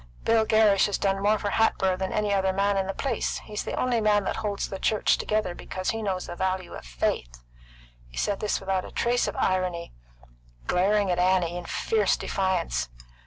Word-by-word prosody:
"Bill 225 -1 +3
Gerrish 215 -3 +4
has 205 - -1
done 195 -1 0
more 210 +2 +3
for 205 0 -3
Hatboro' 190 -4 +2
than 190 0 -3
any 210 -1 0
other 190 -1 +2
man 200 +1 +1
in 190 -1 0
the 195 - -2
place. 275 - -1
He's 210 -1 -5
the - - -4
only 245 -2 +1
man 210 -1 +3
that - - -2
holds 210 -2 -2
the 195 - -6
church 215 +2 +2
together, 215 -4 -1
because 185 +1 -3
he 225 - -4
knows 190 -3 -2
the 175 - -7
value 185 0 -2
of - - -9
faith." - - -3 0.6
He - - -14
said 200 -1 0
this 210 - -1
without 190 -1 -1
a - - -8
trace 240 +1 +1
of - - -4
irony, 180 -2 -1 0.7
glaring 200 +1 +2
at 175 - 0
Annie 180 -1 +2
with 175 - -11
fierce 215 -3 +1
defiance. 185 - -1
195 Hz, 200 wpm, -26 LUFS, 185-210 Hz, 0.7 s, Gerrish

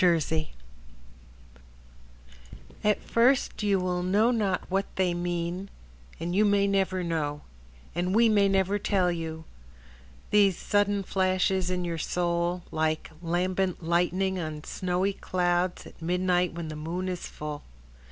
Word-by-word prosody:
Faith 175 -2 +6 0.2
Matheny 155 -1 -1 2.3
At 210 -1 +2
first 245 +2 +2
you 200 -2 +2
will 180 -1 -1
know 205 +6 +3
not 205 -6 0
what 195 +1 0
they 185 -2 +1
mean, 175 +2 -3 0.5
And 170 +2 -3
you 205 +3 +4
may 205 -1 +3
never 190 -2 +1
know, 150 -3 -2 0.5
And 180 +3 -1
we 230 +1 +6
may 205 -2 +4
never 195 +1 +2
tell 190 -3 +2
you:— 160 -1 -5 0.9
These 200 -3 +4
sudden 205 -1 +1
flashes 185 -1 +1
in 180 -1 -1
your 165 -1 -3
soul, 175 +1 -1
Like 155 0 -1
lambent 180 +1 -1
lightning 180 +3 +1
on 155 -2 -5
snowy 185 +3 -1
clouds 180 -1 0
At - - -14
midnight 180 +1 +1
when 170 -2 -5
the 155 - -6
moon 170 +5 -3
is 180 -1 -4
full. 150 -1 -6
180 Hz, 135 wpm, -28 LUFS, 170-195 Hz, 2.3 s, Faith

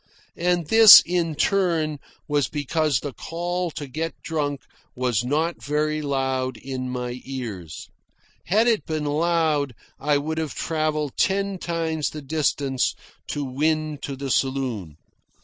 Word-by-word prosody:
And 175 -1 +1
this, 225 +5 +10
in 170 -2 0
turn, 165 -6 +1 0.3
was 145 -4 +1
because 150 -1 0
the 145 -3 -5
call 175 +4 -3
to 145 - -4
get 160 +5 -4
drunk 145 -3 -2 0.3
was 125 -3 0
not 155 +6 -1
very 155 +1 0
loud 130 -2 -1
in 130 -1 -5
my 125 0 -4
ears. 110 - -6 0.6
Had 215 +5 +3
it 230 -3 +1
been 155 -2 -2
loud, 150 -3 +1 0.2
I 145 0 +2
would 160 +3 -2
have 155 -4 -3
travelled 155 -3 -1
ten 195 -1 +1
times 165 -3 -1
the 150 -1 -8
distance 140 -3 0 0.3
to 145 - -3
win 155 +3 -1
to 140 - -5
the 135 0 -4
saloon. 125 - -1
150 Hz, 135 wpm, -24 LUFS, 135-165 Hz, 0.6 s, this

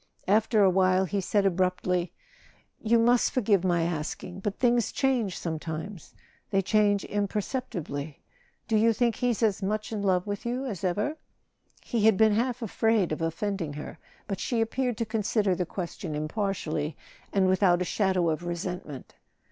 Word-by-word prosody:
After 215 +1 +3
a 190 - +6
while 185 0 +3
he 200 +2 -1
said 200 +2 +1
ab¬ 190 -2 +1
ruptly: 180 -1 0 0.7
"You 230 +1 +3
must 240 +1 +4
forgive 205 -7 +2
my 175 -2 +2
asking: 170 +2 -4
but 200 +1 -3
things 240 -2 +2
change 245 -9 0
sometimes—they 165 +4 -5
change 205 0 +2
imperceptibly. 200 - -3 0.5
Do 225 - +2
you 225 +1 +4
think 235 0 +1
he's 245 -2 0
as 210 -3 +2
much 215 +4 -2
in 215 -2 -2
love 185 -2 +1
with 205 -1 -4
you 245 +3 -2
as 205 -9 -5
ever 205 - -1 0.3
?" - - -36
He 225 -3 0
had 220 -3 +5
been 220 -1 +5
half 245 +2 0
afraid 220 -3 +1
of 155 - -3
offending 165 0 -2
her: 150 +2 -8 0.3
but 195 -2 -4
she 240 - -1
appeared 245 +1 0
to 230 - -1
consider 215 -2 +1
the 180 -1 -2
question 170 -3 -5
impartially, 155 -2 -2 0.3
and 195 -1 +2
without 185 -1 +4
a 180 - -1
shadow 185 -3 +1
of 160 +2 -2
resentment. 175 -5 -5
195 Hz, 165 wpm, -27 LUFS, 175-220 Hz, 0.7 s, a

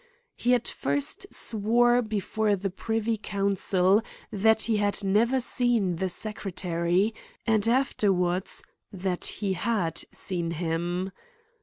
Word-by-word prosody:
He 245 +1 +2
at 240 - -1
first, 140 +1 0
swore 240 +3 +2
before 215 -1 0
the 195 0 -3
privy 225 +3 -1
council, 195 -1 +2 0.3
that 220 +2 +3
he 225 -2 +2
had 205 0 +1
never 225 +7 +2
seen 240 -8 +1
the 190 +2 -1
secretary 180 -1 -1 0.3
and 220 -1 +2
afterwards, 195 -8 +1 0.3
that 185 -2 -2
he 200 -3 0
had 175 -4 0
seen 175 -3 -2
him. 175 +3 -2
200 Hz, 115 wpm, -27 LUFS, 180-225 Hz, 0.3 s, that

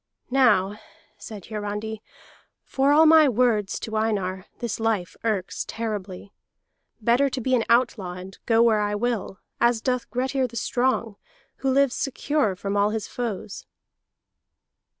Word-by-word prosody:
"Now," 210 -6 +3 0.4
said 210 -5 -9
Hiarandi, 210 0 -5 0.6
"for 270 +1 +1
all 310 +2 +6
my 315 -2 +7
words 230 -4 +1
to 220 - -5
Einar, 195 -4 -1
this 235 -2 -4
life 220 -6 -1
irks 205 -5 -1
terribly. 205 -4 -5 0.7
Better 240 +5 +3
to 260 - -4
be 260 +2 -1
an 240 -3 +3
outlaw, 230 -6 +2
and 185 +2 -9
go 230 0 +4
where 220 -2 +3
I 205 0 -1
will 225 -3 -2 0.2
as 235 -1 +3
doth 250 0 -2
Grettir 260 +1 -1
the 235 - -14
Strong, 235 -2 0 0.4
who 270 - -1
lives 275 -1 +3
secure 275 -5 -1
from 195 +2 -4
all 205 +1 +3
his 215 -1 -3
foes." 215 -4 -5
225 Hz, 140 wpm, -24 LUFS, 205-250 Hz, 0.7 s, my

